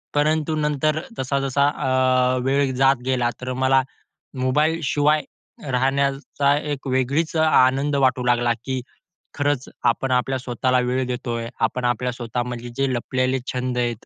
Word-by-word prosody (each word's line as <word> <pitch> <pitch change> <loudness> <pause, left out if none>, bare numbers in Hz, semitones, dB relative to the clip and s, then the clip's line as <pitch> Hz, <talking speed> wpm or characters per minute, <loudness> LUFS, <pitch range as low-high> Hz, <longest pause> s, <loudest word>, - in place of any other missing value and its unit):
परंतु 155 +1 +1
नंतर 150 +1 0 0.2
जसा-जसा 135 +1 +1
अ, 130 -2 +2
वेळ 135 0 +1
जात 135 +1 +4
गेला 125 -2 +1
तर 125 0 -3
मला 130 +1 +3 0.6
मोबाईलशिवाय 150 +1 +2 0.5
राहण्याचा 140 +2 +1
एक 145 -2 -4
वेगळीच 135 +6 0
आनंद 140 -2 +3
वाटू 130 -2 +2
लागला, 120 -1 +2
की 130 -1 -2 0.5
खरंच 145 -2 0 0.2
आपण 125 +2 +1
आपल्या 130 +1 +1
स्वतःला 125 +1 0
वेळ 125 +1 0
देतोय, 120 -2 -3
आपण 125 +2 0
आपल्या 120 +1 0
स्वतःमधले 120 0 -4
जे 135 0 +1
लपलेले 130 +2 -1
छंद 125 -1 -2
आहेत, 120 -2 -2
130 Hz, 130 wpm, -22 LUFS, 125-140 Hz, 0.6 s, जात